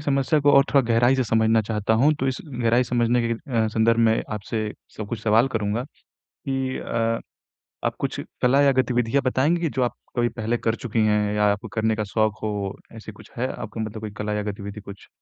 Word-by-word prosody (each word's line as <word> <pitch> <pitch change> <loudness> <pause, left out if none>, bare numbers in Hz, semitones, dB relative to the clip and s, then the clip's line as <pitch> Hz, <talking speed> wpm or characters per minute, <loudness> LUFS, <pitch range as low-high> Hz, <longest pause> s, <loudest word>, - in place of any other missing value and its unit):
समस्या 140 0 +1
को 145 0 +4
और 140 0 +7
थोड़ा 140 - +6
गहराई 120 +3 +4
से 130 - +1
समझना 110 0 +3
चाहता 105 0 0
हूँ, 140 +7 +4
तो 135 - -2
इस 130 - -2
गहराई 120 -2 +1
समझने 120 0 +1
के 115 - 0
अ, 115 -1 -1
संदर्भ 115 +1 +2
में 110 - +2
आपसे 105 +1 -3 0.3
स 110 - -4
कुछ 115 -2 -4
सवाल 115 +4 +4
करूँगा 110 0 -1 0.4
कि 135 -1 -4
अ, 115 0 -1 0.7
आप - - 0
कुछ - - -3 0.2
कला 135 +3 +4
या 140 - +5
गतिविधियाँ 125 +1 0
बताएँगे 145 +7 +1
कि 165 - 0
जो 130 - +2
आप 120 - -1 0.2
कभी 120 0 +2
पहले 115 0 -2
कर 115 0 0
चुकी 115 -2 -3
हैं 105 -1 +1
या 105 - +2
आपको 100 +2 -4
करने 110 0 +1
का 110 - -2
शौक 110 +1 0
हो, 105 -2 -2 0.2
ऐसे 110 -1 -9
कुछ 100 - -16
है 125 +2 0
आपको - - -7
मतलब 110 0 -4
कोई 110 -1 -5
कला 105 0 -2
या 105 - -1
गतिविधि 100 +1 -8
कुछ? 100 -1 -11
115 Hz, 215 wpm, -24 LUFS, 110-125 Hz, 0.7 s, और